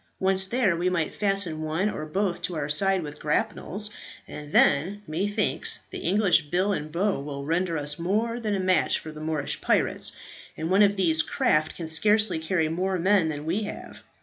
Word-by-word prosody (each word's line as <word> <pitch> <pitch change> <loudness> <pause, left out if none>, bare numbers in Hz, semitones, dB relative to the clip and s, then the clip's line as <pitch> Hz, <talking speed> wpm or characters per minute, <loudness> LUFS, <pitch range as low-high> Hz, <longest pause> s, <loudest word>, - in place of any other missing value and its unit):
Once 190 0 +2
there, 220 -5 +1
we 175 +2 0
might 170 -4 -1
fasten 195 -6 0
one 160 +5 -1
or 155 -7 -4
both 185 +3 -1
to 180 - -3
our 145 -2 -2
side 190 +4 +2
with 150 0 -8
grapnels, 200 +6 -2 0.4
and 150 -1 -9
then, 190 +9 +3
methinks, 205 +6 -1
that - - -6
English 185 -3 +3
bill 185 +6 +1
and 155 -4 -4
bow 190 +3 0
will 140 0 -6
render 165 +2 0
us 145 +1 -2
more 220 +7 -1
than 215 -3 -1
a - - -1
match 185 -1 +2
for 155 - -9
Moorish 155 -1 -3
pirates, - - 0 0.4
and 160 +3 -3
one 195 +2 +5
of 200 -1 +4
these 165 -5 +3
craft 155 -1 0
can 165 - -6
scarcely 210 +4 +2
carry 160 0 0
more 185 +4 -1
men 185 -1 +3
than 150 -1 -5
we 175 +7 -1
have. 205 - -8
175 Hz, 185 wpm, -26 LUFS, 155-200 Hz, 0.4 s, one